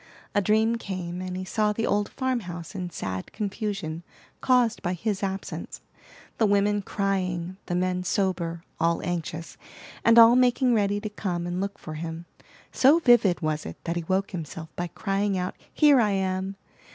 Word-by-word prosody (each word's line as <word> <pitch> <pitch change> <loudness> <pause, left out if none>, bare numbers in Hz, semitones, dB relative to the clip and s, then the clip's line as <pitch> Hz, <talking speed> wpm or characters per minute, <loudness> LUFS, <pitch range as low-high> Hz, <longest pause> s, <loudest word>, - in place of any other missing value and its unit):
A 205 - +3
dream 220 +3 +2
came, 185 -4 -5
and 185 0 -4
he 185 - -4
saw 210 +2 +1
the 225 +2 -1
old 205 0 +1
farm 260 -2 -1
house 175 -4 -8
in 180 -3 -4
sad 95 - -5
confusion, 195 -6 -3 0.4
caused 245 -3 +3
by 175 - -1
his 205 +2 -2
absence, 195 -1 -4 0.6
the 220 - +4
women 205 +1 +2
crying, 185 -3 -2
the 175 - -1
men 180 0 0
sober, 170 -3 -1 0.2
all 165 +1 +1
anxious, 170 -1 -4 0.5
and 230 0 +5
all 230 +1 +9
making 250 0 +4
ready 205 -2 +2
to 215 +1 -5
come 175 -4 -3
and 175 +1 -2
look 200 +1 -3
for 155 - -8
him. 165 +1 -6 0.5
So 275 +5 +5
vivid 240 - +4
was 155 -1 -1
it - - -7
that 170 -1 -2
he 170 - -2
woke 190 +2 0
himself 160 -2 -6
by 175 - -2
crying 195 +2 -1
out, 180 0 -3 0.2
"Here 295 -4 +5
I 215 - +2
am!" 190 0 -1
190 Hz, 175 wpm, -26 LUFS, 175-210 Hz, 0.6 s, all